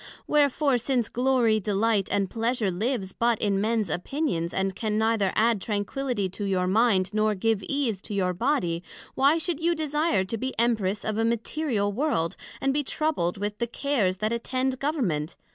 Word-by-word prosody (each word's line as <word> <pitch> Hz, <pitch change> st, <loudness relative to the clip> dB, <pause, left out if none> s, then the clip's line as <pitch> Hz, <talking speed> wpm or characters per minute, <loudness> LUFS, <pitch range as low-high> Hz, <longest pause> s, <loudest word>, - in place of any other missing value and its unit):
wherefore, 285 Hz, -2 st, +2 dB
since 240 Hz, -2 st, 0 dB
glory, 245 Hz, -3 st, +2 dB
delight, 205 Hz, 0 st, +1 dB
and 200 Hz, -1 st, +1 dB
pleasure 230 Hz, -1 st, 0 dB
lives 200 Hz, 0 st, -2 dB
but 235 Hz, -1 st, +1 dB
in 205 Hz, -2 st, +1 dB
other 195 Hz, -, +1 dB
mens 220 Hz, -1 st, +1 dB
opinions, 175 Hz, -, -2 dB
and 190 Hz, 0 st, -1 dB
can 215 Hz, 0 st, -1 dB
neither 220 Hz, -3 st, +2 dB
add 225 Hz, -2 st, +2 dB
tranquility 210 Hz, +2 st, -2 dB
to 190 Hz, +3 st, -7 dB
your 190 Hz, -2 st, +1 dB
mind 195 Hz, -1 st, +2 dB
nor 215 Hz, 0 st, +2 dB
give 220 Hz, +1 st, +1 dB
ease 250 Hz, -9 st, 0 dB
to 210 Hz, -, -6 dB
your 185 Hz, -2 st, +1 dB
body, 180 Hz, -, 0 dB, 0.3 s
Why 280 Hz, +4 st, +4 dB
should 330 Hz, -1 st, -2 dB
you 340 Hz, +1 st, +1 dB
desire 300 Hz, -, +1 dB
to 195 Hz, +4 st, -4 dB
be 260 Hz, +2 st, -4 dB
Empress 215 Hz, -4 st, +1 dB
of 215 Hz, 0 st, -1 dB
a -, -, +2 dB
Material 230 Hz, -1 st, 0 dB
World, 210 Hz, -, 0 dB, 0.2 s
and 270 Hz, 0 st, +1 dB
be 295 Hz, +1 st, +1 dB
troubled 265 Hz, -, -1 dB
with 205 Hz, +1 st, -4 dB
the 235 Hz, -, 0 dB
cares 235 Hz, -8 st, 0 dB
that 215 Hz, +3 st, -1 dB
attend 255 Hz, +2 st, -1 dB
Government? 200 Hz, -, -1 dB
225 Hz, 180 wpm, -26 LUFS, 195-265 Hz, 0.3 s, Why